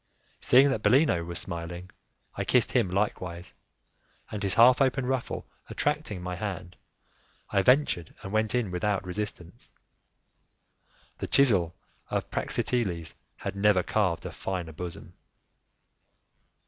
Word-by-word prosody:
Seeing 135 Hz, +3 st, +6 dB
that 110 Hz, -, -1 dB
Bellino 130 Hz, -, +3 dB
was 85 Hz, 0 st, -6 dB
smiling, 85 Hz, +2 st, -5 dB, 0.4 s
I -, -, -2 dB
kissed -, -, +3 dB
him 95 Hz, -, +2 dB
likewise, 90 Hz, -2 st, -3 dB, 0.8 s
and 105 Hz, -, -4 dB
his 95 Hz, -1 st, 0 dB
half 125 Hz, +4 st, +6 dB
open 135 Hz, -1 st, +2 dB
ruffle 130 Hz, -1 st, -2 dB, 0.2 s
attracting 145 Hz, -, -2 dB
my 90 Hz, 0 st, -4 dB
hand, 95 Hz, -2 st, -5 dB, 0.8 s
I 100 Hz, -, +3 dB
ventured 125 Hz, -, +2 dB
and 95 Hz, -, -6 dB
went 110 Hz, +1 st, +1 dB
in 115 Hz, -7 st, 0 dB
without 100 Hz, +1 st, -1 dB
resistance. 90 Hz, -2 st, -6 dB, 1.5 s
The -, -, -3 dB
chisel 95 Hz, -12 st, +3 dB, 0.3 s
of -, -, -3 dB
Praxiteles 90 Hz, -10 st, -1 dB, 0.2 s
had -, -, -5 dB
never 100 Hz, -2 st, +3 dB
carved 100 Hz, -5 st, 0 dB
a -, -, -4 dB
finer 90 Hz, -4 st, -4 dB
bosom! 85 Hz, +1 st, -8 dB
100 Hz, 120 wpm, -28 LUFS, 90-120 Hz, 1.5 s, Seeing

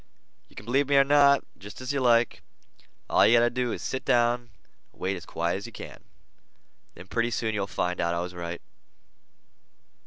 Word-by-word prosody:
"You -, -, -22 dB
can 105 Hz, -, -10 dB
believe 135 Hz, +4 st, +1 dB
me 140 Hz, -, +3 dB
or 140 Hz, -, +7 dB
not, 140 Hz, 0 st, +4 dB, 0.2 s
jest 105 Hz, +4 st, -11 dB
as 130 Hz, +2 st, -4 dB
you 140 Hz, -, 0 dB
like. 120 Hz, -2 st, +2 dB, 0.7 s
All -, -, +4 dB
you 120 Hz, -, +6 dB
got -, -, +5 dB
to 120 Hz, -, +2 dB
do 125 Hz, -1 st, -1 dB
is -, -, -5 dB
sit 130 Hz, -, -3 dB
down 120 Hz, 0 st, +1 dB, 0.4 s
and -, -, -27 dB
wait 95 Hz, +1 st, -1 dB
as 90 Hz, -, -10 dB
quiet 85 Hz, +2 st, -1 dB
as 100 Hz, -, -7 dB
you -, -, -11 dB
can. -, -, -10 dB, 1.0 s
Then 90 Hz, -, -11 dB
pretty 115 Hz, +4 st, -1 dB
soon 115 Hz, -1 st, -2 dB
you'll 100 Hz, -2 st, -2 dB
find 90 Hz, -2 st, -2 dB
out 85 Hz, 0 st, 0 dB
I -, -, -1 dB
was 90 Hz, +1 st, -6 dB
right." 85 Hz, -1 st, -6 dB
115 Hz, 205 wpm, -26 LUFS, 95-125 Hz, 1.0 s, or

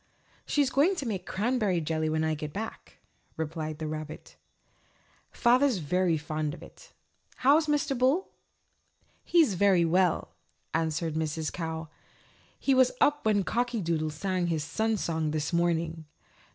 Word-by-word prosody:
"She's 285 Hz, -3 st, +2 dB
going 305 Hz, +9 st, +3 dB
to 290 Hz, -, -4 dB
make 205 Hz, -6 st, -4 dB
cranberry 210 Hz, -3 st, 0 dB
jelly 155 Hz, 0 st, -1 dB
when 155 Hz, 0 st, 0 dB
I 160 Hz, 0 st, +1 dB
get 150 Hz, -1 st, -5 dB
back," 220 Hz, +5 st, -7 dB, 0.4 s
replied 155 Hz, -1 st, -4 dB
the 160 Hz, -, -5 dB
little 155 Hz, 0 st, -3 dB
rabbit. 155 Hz, 0 st, -10 dB, 0.9 s
"Father's 250 Hz, 0 st, +3 dB
very 175 Hz, +1 st, +1 dB
fond 155 Hz, 0 st, -3 dB
of -, -, -13 dB
it. -, -, -15 dB, 0.4 s
How's 295 Hz, +4 st, +4 dB
Mr. 295 Hz, -2 st, +1 dB
Bull?" 265 Hz, +9 st, +2 dB, 0.9 s
"He's 325 Hz, -, +4 dB
very 185 Hz, -2 st, +4 dB
well," 180 Hz, +1 st, +1 dB, 0.4 s
answered 160 Hz, 0 st, -1 dB
Mrs. 160 Hz, 0 st, -2 dB
Cow. 160 Hz, -1 st, -4 dB, 0.7 s
"He 275 Hz, -, +2 dB
was 260 Hz, -1 st, +5 dB
up 295 Hz, 0 st, +3 dB
when 205 Hz, -2 st, +3 dB
Cocky 240 Hz, +4 st, -1 dB
Doodle 165 Hz, -4 st, -1 dB
sang 180 Hz, +3 st, -2 dB
his 160 Hz, -3 st, -1 dB
Sun 220 Hz, +7 st, 0 dB
Song 160 Hz, -4 st, -1 dB
this 150 Hz, +1 st, -2 dB
morning." 165 Hz, -1 st, 0 dB
175 Hz, 145 wpm, -28 LUFS, 160-240 Hz, 0.9 s, was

